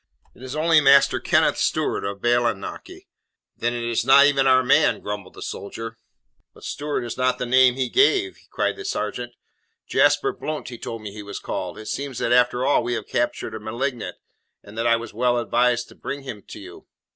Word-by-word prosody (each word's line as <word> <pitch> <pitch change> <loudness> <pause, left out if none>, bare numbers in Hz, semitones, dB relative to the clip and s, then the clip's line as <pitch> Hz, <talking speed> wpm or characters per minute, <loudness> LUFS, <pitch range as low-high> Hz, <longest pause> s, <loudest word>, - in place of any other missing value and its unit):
It - - -19
is 130 +2 -7
only 160 0 +4
Master 140 0 +5
Kenneth - - +2
Stewart, - - 0
of 100 0 -5
Bailienochy." 120 -4 -1 0.5
"Then 120 +1 -1
it 120 - -4
is 115 -1 0
not 135 +3 +7
even 135 -2 +3
our 130 0 +5
man," 145 +4 +3
grumbled 105 -2 -6
the - - -8
soldier. 115 +3 -7 0.6
"But - - -17
Stewart 145 -3 -3
is 120 +1 -6
not 130 0 +2
the 125 - -3
name 125 0 +5
he 130 -1 -1
gave," 390 -1 +2
cried - - -1
the 405 - -7
sergeant. 400 - -4 0.5
"Jasper 410 -1 +3
Blount 155 - -5
he 120 -2 -9
told 115 -2 -6
me 105 - -6
he 105 - -8
was 100 0 -7
called. - - -5
It 110 - -9
seems 140 +1 -4
that 115 - -1
after 125 +1 +3
all 145 - +3
we 120 +1 -2
have - - -3
captured 120 - -2
a 110 - -5
malignant, 120 +2 -4 0.5
and 105 - -13
that 115 +1 -1
I 115 - +5
was 115 -1 -6
well 120 +2 +1
advised 120 0 +1
to - - -16
bring 140 0 -6
him 125 -6 -7
to - - -9
you." - - -12
125 Hz, 205 wpm, -23 LUFS, 115-135 Hz, 0.6 s, not